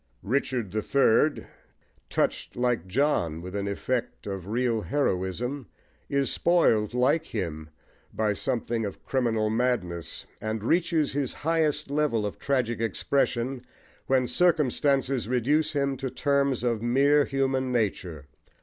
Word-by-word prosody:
Richard 120 -3 -1
the 110 +2 -1
Third, 140 +4 +3 0.6
touched, - - -1
like 125 -7 0
John, 95 - +1
with 90 +3 -7
an 100 0 -2
effect 120 +5 -3
of 95 -3 -5
real 115 0 0
heroism, 125 +1 -1 0.4
is 140 -1 +1
spoiled 120 - +2
like 140 +6 +2
him 80 -7 -4 0.4
by 110 -1 0
something 120 -1 -1
of 100 -2 -6
criminal 115 -5 0
madness, 110 - -1 0.2
and 110 -1 -3
reaches 165 +1 +2
his 140 -2 -2
highest 155 -3 +1
level 145 -8 +1
of 105 - -5
tragic 125 -5 0
expression 125 +3 0 0.4
when 130 -1 +3
circumstances 140 -5 +2
reduce 140 +6 +1
him 140 -1 0
to 135 0 -3
terms 140 -2 +1
of 115 -3 0
mere 140 +5 +4
human 135 -1 0
nature. 90 - -2
125 Hz, 125 wpm, -27 LUFS, 110-140 Hz, 0.6 s, mere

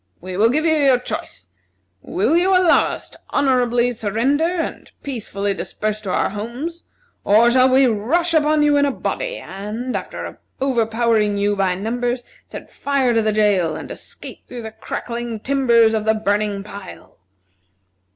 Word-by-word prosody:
We 185 +1 -7
will 215 +4 +4
give 305 +6 +1
you 320 - +4
your 275 -4 +4
choice: 95 - -6 0.5
Will 225 - 0
you 370 +2 +3
allow 365 -2 +4
us - - -6
to - - -16
honorably 245 -3 +2
surrender, 235 +8 0
and 345 -1 -3
peacefully 205 -6 -3
disperse 215 +2 -4
to 200 - -6
our - - 0
homes, 245 +11 -6 0.4
or 225 +4 +5
shall 255 +1 +5
we 265 +1 +5
rush 265 +10 +1
upon 305 -1 +3
you 295 -1 +4
in 285 - +4
a - - 0
body, - - -3
and, 215 +6 -5
after - - -6 0.2
overpowering 225 -4 +1
you 205 +1 +1
by 190 -2 +1
numbers, 240 +5 -2 0.2
set - - -9
fire 275 -3 0
to 225 - +3
the 215 0 +1
jail, 205 -6 +2
and - - -7
escape - - -10
through 245 -2 -8
the 220 - -6
crackling 235 +1 -5
timbers 235 -3 +3
of 215 -1 -1
the 220 0 +3
burning 205 -1 -1
pile?" 200 - -11
235 Hz, 160 wpm, -20 LUFS, 210-275 Hz, 0.5 s, or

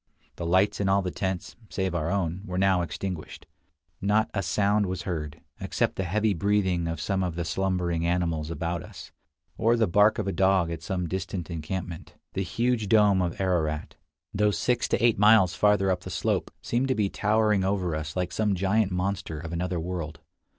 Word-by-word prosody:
The 85 - -3
lights 95 +4 +3
in 100 -1 +1
all 100 0 +3
the 90 - -2
tents, 95 -1 -3
save 95 -2 -2
our 85 -2 -1
own, 95 -2 -1
were 90 0 -3
now 95 -1 +3
extinguished. 85 +1 -5 0.6
Not 105 +2 +2
a 100 - 0
sound 100 +2 +1
was 90 -1 -3
heard, 75 -5 -4 0.2
except - - -1
the 95 - -2
heavy 105 +4 +1
breathing 95 -2 +1
of 80 0 -3
some 95 -2 -1
of 90 -3 -2
the 85 -1 -2
slumbering 90 -1 -1
animals 85 -3 0
about 85 +1 -3
us, - - -11 0.5
or 115 +2 +3
the 115 - +3
bark 105 +3 +4
of 105 - -2
a - - +1
dog 95 -3 +2
at 80 -1 -5
some 90 0 -2
distant 95 0 -4
encampment. 85 +1 -5 0.2
The 95 - -1
huge 115 +2 0
dome 105 -3 +5
of 85 -2 -2
Ararat, 80 -5 -1 0.4
though 105 +1 +3
six 120 +4 0
to - - +1
eight 115 -4 +3
miles 105 -3 +6
farther 95 +1 +3
up 90 -1 -1
the - - -8
slope, - - -1
seemed 125 +3 0
to 130 - +1
be 105 -2 +1
towering 105 0 +2
over 95 -4 0
us 75 -1 -5
like 90 -1 -1
some 105 -2 +1
giant 100 +2 +1
monster 90 -3 -2
of 85 +1 -7
another 90 0 -2
world. 80 -2 -4
95 Hz, 190 wpm, -27 LUFS, 85-100 Hz, 0.6 s, miles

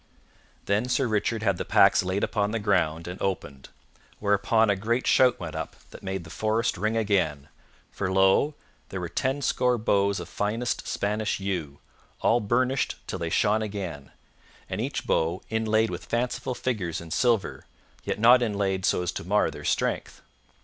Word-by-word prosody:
Then 105 +5 0
Sir 130 +2 +2
Richard 110 +1 0
had 100 -4 +2
the - - -2
packs - - +5
laid 95 +2 -2
upon 105 -2 0
the 115 - -1
ground 90 -6 0
and 90 +1 -7
opened, 70 -8 -3 0.5
whereupon 105 +2 +2
a - - +2
great 115 +6 -1
shout 125 -2 +4
went 80 -3 -6
up 80 -1 -5 0.2
that - - -11
made 95 -2 -4
the 80 - -12
forest 110 +4 0
ring 110 +4 -1
again, 85 -10 0 0.4
for 95 -2 -3
lo, 95 +10 +3 0.3
there 95 - -4
were 85 -2 -4
tenscore 130 -1 +1
bows 100 -2 +1
of 85 - -7
finest 115 +4 -2
Spanish 105 +1 -1
yew, 90 -8 -3 0.4
all 120 - +3
burnished 125 +5 0
till 95 - -5
they 85 -1 -2
shone 105 +6 +2
again, 95 -9 -5 0.6
and - - -3
each - - -3
bow 85 +4 0
inlaid 110 0 +1
with - - -6
fanciful 125 +1 -2
figures 95 -10 -2
in 85 -2 -10
silver, 115 +1 0 0.4
yet - - -2
not 120 +3 +6
inlaid 100 -4 0
so 90 - +1
as 90 - -1
to - - -6
mar 105 +4 +2
their - - -9
strength. - - -1
100 Hz, 170 wpm, -26 LUFS, 90-115 Hz, 0.6 s, not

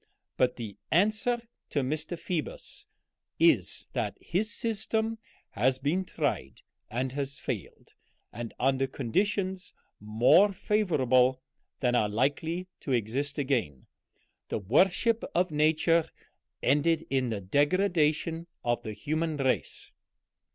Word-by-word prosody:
But 125 -1 +2
the 110 -4 -7
answer 215 +6 +2 0.3
to 145 - 0
Mr. 155 +5 -3
Phoebus 165 -2 -5 0.5
is, - - +3
that - - -2
his 215 +5 -1
system 225 0 -1 0.3
has 130 +4 +2
been 155 +8 0
tried 150 -5 -3 0.3
and 125 +3 -2
has 140 0 -4
failed, - - -6 0.4
and 115 +1 -5
under 135 +1 +2
conditions 185 - -1 0.2
more 115 - +5
favorable 130 - +2 0.4
than 125 -2 +2
are 110 -4 +2
likely 145 - 0
to 140 - -5
exist 130 +5 -1
again; 125 - -1 0.6
the - - -1
worship 185 - +2
of 180 0 +2
Nature 155 +2 +3 0.5
ended 160 +4 +2
in 130 -2 +1
the 110 -3 -2
degradation 160 - +1 0.2
of 120 -1 0
the 110 - -6
human 155 +8 -2
race." 130 - -1
145 Hz, 115 wpm, -29 LUFS, 125-180 Hz, 0.6 s, more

